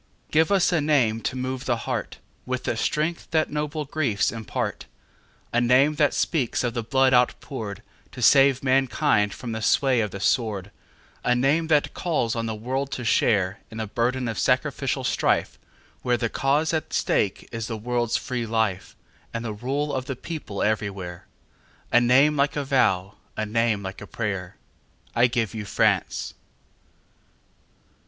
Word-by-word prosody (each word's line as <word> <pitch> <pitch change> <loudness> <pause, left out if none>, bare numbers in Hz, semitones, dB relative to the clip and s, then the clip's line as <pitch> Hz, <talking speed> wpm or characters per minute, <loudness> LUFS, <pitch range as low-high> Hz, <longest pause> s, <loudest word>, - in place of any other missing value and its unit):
Give 160 +4 +3
us 190 -2 +3
a 170 -3 +2
name 130 -7 +2
to 130 - -2
move 130 +1 -3
the 120 -2 +1
heartWith 125 0 -5
the - - -1
strength 155 +8 -1
that 160 -1 +1
noble 150 0 -2
griefs 135 -8 0
impart,A 115 +1 -5
name 130 +5 +4
that 145 -2 +3
speaks 130 -8 0
of 120 -1 -1
the 120 - -2
blood 130 +3 +2
outpouredTo 125 -4 -2
save 135 -1 +5
mankind 130 -4 +2
from 120 +2 -6
the 110 0 -4
sway 130 +2 +3
of 105 - -1
the 100 - -7
sword,—A 105 +3 -2
name 140 +6 +2
that 150 -2 +2
calls 135 -10 -1
on 115 0 -2
the 110 - -3
world 130 +5 -3
to 125 - -4
shareIn 100 -3 +2 0.2
the 110 - -2
burden 120 +4 -1
of 115 -4 -3
sacrificial - - 0
strifeWhere 125 -1 -1
the 115 -1 -1
cause 145 +6 +1
at 160 - -2
stake 100 - 0
is 115 -1 -4
the 115 - -4
world's 120 +1 0
free 125 -3 -3
lifeAnd 110 -4 -1 0.5
the 110 -2 -3
rule 140 +7 -2
of 130 -1 -2
the 135 - -4
people 145 -8 -5
everywhere,—A 100 +2 -3
name 135 +5 +5
like 140 0 +1
a 145 - -1
vow, 100 -8 +1 0.2
a 110 - -1
name 110 -1 0
like 95 0 -7
a - - -8
prayer.I 105 +3 -3
give 115 -3 -1
you 110 -2 -4
France! - - 0
120 Hz, 145 wpm, -24 LUFS, 110-140 Hz, 0.5 s, save